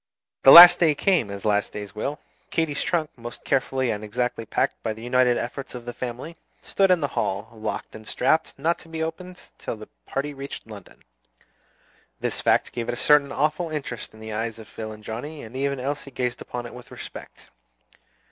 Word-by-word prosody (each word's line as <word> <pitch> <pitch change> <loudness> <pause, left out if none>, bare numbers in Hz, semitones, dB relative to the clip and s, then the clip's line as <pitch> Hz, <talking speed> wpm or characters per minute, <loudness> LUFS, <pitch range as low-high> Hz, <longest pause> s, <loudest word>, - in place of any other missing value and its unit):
The 135 - +8
last 175 +3 +12
day 160 -4 +4
came, 175 - +2
as 100 0 -7
last 105 -1 +1
days 105 -1 -7
will. 140 +7 -3 0.3
Katy's 155 -3 0
trunk, 165 -3 0
most 120 0 -9
carefully 130 -2 0
and 105 0 -4
exactly 115 +1 -2
packed - - -1
by 110 - -2
the 110 +1 -11
united 125 0 +3
efforts 130 +2 -5
of 120 -1 -8
the 120 - -5
family, 130 +7 -6 0.2
stood 195 -1 +1
in 180 -2 +4
the 145 - 0
hall, 105 -2 -2
locked 110 -1 -5
and 110 0 -11
strapped, 155 +5 +1
not 170 +1 0
to 165 - -15
be 160 0 -3
opened 180 +3 -6
again - - -17
till - - -4
the 110 0 -12 0.2
party 140 +2 -3
reached 140 0 -8
London. 105 -4 -13 1.2
This - - -2
fact - - +2
gave 120 -1 -4
it - - 0
a 120 - -3
certain 145 -2 +5
awful 155 +5 0
interest 135 -7 -5
in 110 - -16
the 110 0 -7
eyes 115 +1 -3
of 110 - -11
Phil 110 -1 -7
and 105 0 -11
Johnnie, 145 +9 -6
and 110 +3 -11
even 140 0 -1
Elsie 140 +2 -4
gazed 125 -2 -3
upon 120 -1 -6
it 120 - -9
with 125 0 -12
respect. - - -11
125 Hz, 205 wpm, -24 LUFS, 110-150 Hz, 1.2 s, last